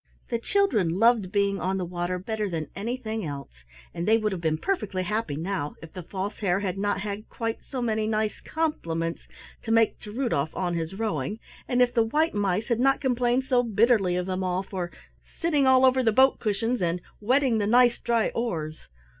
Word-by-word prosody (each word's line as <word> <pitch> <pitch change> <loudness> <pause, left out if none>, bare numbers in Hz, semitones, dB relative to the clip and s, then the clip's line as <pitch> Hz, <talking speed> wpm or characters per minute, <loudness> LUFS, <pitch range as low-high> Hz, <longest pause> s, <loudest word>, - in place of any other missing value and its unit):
The 235 - 0
children 230 - +1
loved 225 -3 +3
being 200 -1 +1
on 185 +3 -1
the 185 - -2
water 175 +1 -2
better 210 +2 -3
than 160 -4 -4
anything 225 0 -3
else, 140 -3 -6 0.4
and 170 - -4
they 220 +1 +5
would 215 -1 0
have 185 -3 -4
been 160 -1 +1
perfectly 205 - -2
happy 210 -6 -2
now, 160 -2 -3
if 165 - -11
the 185 - -6
False 190 +4 -5
Hare 195 -2 +1
had 190 -3 -2
not 200 0 -1
had 210 +1 -5
quite 225 -1 -3
so 255 -3 -4
many 220 -2 0
nice 215 -1 -1
compliments 165 - -2 0.3
to 225 - -4
make 225 -1 +3
to 210 - -9
Rudolf 215 - -1
on 180 -2 -1
his 165 +2 -3
rowing, 215 0 -2 0.3
and 250 0 +4
if 245 0 0
the 230 - +3
white 300 +9 +1
mice 205 +1 0
had 235 -1 +1
not 270 +2 +3
complained 250 -1 +1
so 255 -1 +3
bitterly 220 -4 +3
of 180 0 -1
them 185 0 -2
all 185 +1 -1
for 180 -3 -5 0.3
"sitting 300 -5 0
all 260 0 +6
over 260 0 +4
the 230 -3 +3
boat 265 +4 +4
cushions," 225 +2 -1
and 175 0 0 0.2
"wetting 250 +1 +2
the 205 - 0
nice 240 +1 +5
dry 235 -2 +1
oars!" 160 -10 -4
210 Hz, 200 wpm, -26 LUFS, 180-240 Hz, 0.4 s, all